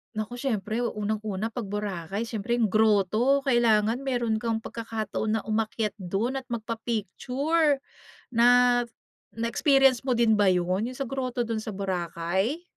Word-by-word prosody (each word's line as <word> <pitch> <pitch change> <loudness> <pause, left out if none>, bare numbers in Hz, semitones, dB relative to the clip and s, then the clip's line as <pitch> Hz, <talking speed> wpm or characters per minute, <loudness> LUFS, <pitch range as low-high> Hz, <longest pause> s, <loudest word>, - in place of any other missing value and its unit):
Naku 215 +3 -4
siyempre 230 -2 -2
unang-una 215 -1 -2
'pag 230 -2 -5
Boracay 205 +1 -3
siyempre 235 +2 -2
'yung 220 - +3
groto, 220 +5 +3
kailangan 235 0 +3
meron 240 -4 0
kang 225 -1 0
pagkakataon 220 -1 -3
na - - -7
umakyat 215 -1 -1
do'n 200 +7 -2
at 265 - -3
magpa-picture. 245 - -1 0.5
Na 235 0 +4 0.9
na-experience 260 +2 +3
mo 250 - +2
din 220 -2 +3
ba 200 - +4
'yun, 185 +4 +1
'yung 255 - -7
sa 275 - -3
groto 255 -1 -2
do'n 225 -1 -2
sa 215 -2 -6
Boracay? 190 - -2
225 Hz, 135 wpm, -26 LUFS, 210-245 Hz, 0.9 s, Na